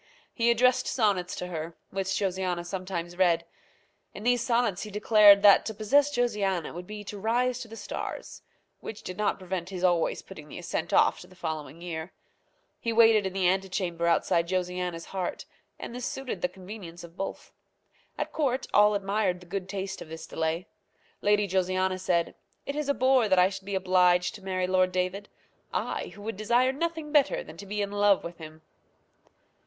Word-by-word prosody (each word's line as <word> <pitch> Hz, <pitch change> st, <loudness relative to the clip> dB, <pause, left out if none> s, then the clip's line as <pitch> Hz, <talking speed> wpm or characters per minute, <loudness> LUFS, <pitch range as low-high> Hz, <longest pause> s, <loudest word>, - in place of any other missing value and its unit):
He 235 Hz, -1 st, +2 dB
addressed 250 Hz, +2 st, +3 dB
sonnets 200 Hz, -7 st, +1 dB
to -, -, -4 dB
her, 165 Hz, -2 st, -6 dB
which 195 Hz, 0 st, -1 dB
Josiana 185 Hz, -3 st, -1 dB
sometimes 175 Hz, -1 st, -4 dB
read. 170 Hz, -2 st, +3 dB, 0.7 s
In 205 Hz, -, -8 dB
these 245 Hz, 0 st, +3 dB
sonnets 235 Hz, -6 st, +1 dB
he 215 Hz, -, -5 dB
declared 210 Hz, -1 st, +6 dB
that 200 Hz, -1 st, +8 dB
to 220 Hz, -, -4 dB
possess 280 Hz, +8 st, +3 dB
Josiana 210 Hz, -, 0 dB
would 175 Hz, +1 st, -8 dB
be 210 Hz, 0 st, -7 dB
to 205 Hz, 0 st, -7 dB
rise 245 Hz, +4 st, +1 dB
to 240 Hz, -, -7 dB
the 225 Hz, -, -10 dB
stars, 205 Hz, -, -6 dB, 0.4 s
which 215 Hz, -, -8 dB
did 185 Hz, -, -6 dB
not 210 Hz, +2 st, 0 dB
prevent 185 Hz, -1 st, -4 dB
his 185 Hz, -2 st, -6 dB
always 175 Hz, -3 st, +2 dB
putting 155 Hz, -6 st, -11 dB
the -, -, -8 dB
ascent 170 Hz, -1 st, -3 dB
off -, -, +4 dB
to 180 Hz, -, -12 dB
the 185 Hz, -, -18 dB
following 160 Hz, -1 st, -5 dB
year. 165 Hz, 0 st, -5 dB, 0.7 s
He 230 Hz, -, -2 dB
waited 225 Hz, -3 st, +5 dB
in 190 Hz, -, -6 dB
the 190 Hz, -2 st, +2 dB
antechamber 185 Hz, -2 st, 0 dB
outside 170 Hz, 0 st, +2 dB
Josiana's 180 Hz, -2 st, -2 dB
heart; 185 Hz, -2 st, -4 dB, 0.3 s
and -, -, -7 dB
this 250 Hz, 0 st, -4 dB
suited 270 Hz, -2 st, -5 dB
the 270 Hz, -, +1 dB
convenience 185 Hz, -4 st, -10 dB
of 170 Hz, 0 st, -12 dB
both. 195 Hz, -, -6 dB, 0.7 s
At -, -, -3 dB
court 265 Hz, -4 st, 0 dB
all 210 Hz, 0 st, +6 dB
admired 200 Hz, -2 st, 0 dB
the 180 Hz, -, -15 dB
good 190 Hz, +1 st, -5 dB
taste 195 Hz, -1 st, -4 dB
of 155 Hz, -, -9 dB
this 160 Hz, 0 st, -7 dB
delay. 160 Hz, +3 st, -2 dB, 0.6 s
Lady 205 Hz, 0 st, +3 dB
Josiana 185 Hz, 0 st, 0 dB
said, 175 Hz, -2 st, 0 dB, 0.3 s
"It 280 Hz, -, -4 dB
is 300 Hz, -1 st, -2 dB
a 280 Hz, -, +2 dB
bore 260 Hz, -3 st, +3 dB
that 190 Hz, -, +4 dB
I 180 Hz, +1 st, +6 dB
should 195 Hz, -1 st, -8 dB
be 200 Hz, 0 st, -3 dB
obliged 180 Hz, -1 st, +3 dB
to 210 Hz, -, -11 dB
marry 185 Hz, -1 st, -1 dB
Lord 185 Hz, 0 st, +2 dB
David; 185 Hz, +3 st, -2 dB, 0.4 s
I, -, -, -2 dB
who 205 Hz, -, -11 dB
would 220 Hz, -2 st, -4 dB
desire 240 Hz, +4 st, +3 dB
nothing 320 Hz, +1 st, -3 dB
better 310 Hz, -, +3 dB
than -, -, -12 dB
to 200 Hz, -, -9 dB
be 205 Hz, +1 st, -1 dB
in 200 Hz, -, -4 dB
love 205 Hz, -1 st, +3 dB
with 170 Hz, 0 st, -8 dB
him!" 155 Hz, 0 st, -11 dB
190 Hz, 190 wpm, -28 LUFS, 180-215 Hz, 0.7 s, that